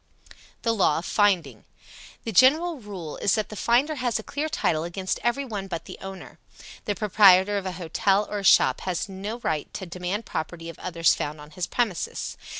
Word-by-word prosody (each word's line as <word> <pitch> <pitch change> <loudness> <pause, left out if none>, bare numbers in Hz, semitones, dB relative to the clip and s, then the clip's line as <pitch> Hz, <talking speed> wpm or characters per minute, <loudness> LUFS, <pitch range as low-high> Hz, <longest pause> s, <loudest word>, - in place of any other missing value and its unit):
THE 230 - +2
LAW 190 -8 +3
OF 170 - -4
FINDING. 175 - +1 0.6
The 225 - -3
general 300 - +4
rule 190 -8 -7
is 195 - +2
that 215 - -2
the 215 - -8
finder 245 +8 +2
has 245 -3 0
a 220 - -6
clear 295 +6 -3
title 160 - 0
against 185 +2 -3
every 240 +5 0
one 205 -6 -5
but 170 -3 -5
the - - -10
owner. 190 -1 -9 0.5
The 205 - -1
proprietor 200 -1 +5
of 190 - -6
a 185 - -3
hotel 195 +4 +1
or 210 - -3
a - - -6
shop - - +5
has 185 +3 -2
no 200 +4 -5
right 155 -2 -2
to 190 - -5
demand 180 +5 -4
property 165 +1 -5
of 165 - -10
others 165 -3 +2
found 150 +1 -4
on 150 +1 -12
his 180 0 -3
premises. 225 -8 -2
195 Hz, 195 wpm, -25 LUFS, 175-220 Hz, 0.6 s, proprietor